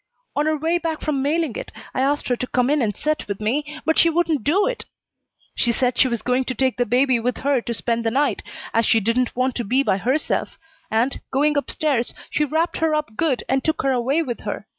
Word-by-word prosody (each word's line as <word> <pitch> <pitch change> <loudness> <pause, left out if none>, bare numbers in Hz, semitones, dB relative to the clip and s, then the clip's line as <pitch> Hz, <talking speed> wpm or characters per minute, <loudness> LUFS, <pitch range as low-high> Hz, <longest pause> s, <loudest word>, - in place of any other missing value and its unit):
"On 295 +2 +1
her 310 0 +1
way 325 +3 +1
back 325 -2 -3
from 285 -3 -1
mailing 300 -2 0
it - - -6 0.2
I - - 0
asked 285 +2 +1
her 245 - +3
to 255 - -4
come 250 +2 +1
in 295 -1 +2
and 210 -4 -1
set 305 0 -1
with 200 -1 -4
me, 295 +8 -2
but 320 - +2
she 335 - +6
wouldn't 325 -5 +1
do 375 - +3
it; - - -2 0.7
she 240 - +2
said 250 +1 0
she - - +4
was 235 -3 -2
going 250 +1 +1
to 255 - -3
take 260 -2 +1
the 245 - +1
baby 250 +2 +3
with 245 +2 -1
her 280 -3 +3
to 235 - -3
spend 230 +1 -1
the 225 - +1
night, 280 +5 +1 0.3
as 230 -1 +2
she 225 - +4
didn't 230 +4 0
want 255 +1 +1
to 240 - -1
be 255 +6 +2
by 190 - +2
herself; 260 +9 -1 0.3
and, 235 +5 0
going 295 +3 +2
up 285 - -1
stairs, 275 -6 0 0.2
she 300 - +1
wrapped 320 +4 0
her 320 -1 +1
up 300 -8 -3
good 295 -4 0
and 265 0 +1
took 315 -3 0
her 270 - +2
away 265 +6 +1
with 245 -6 -4
her. - - -5
265 Hz, 245 wpm, -22 LUFS, 240-305 Hz, 0.7 s, she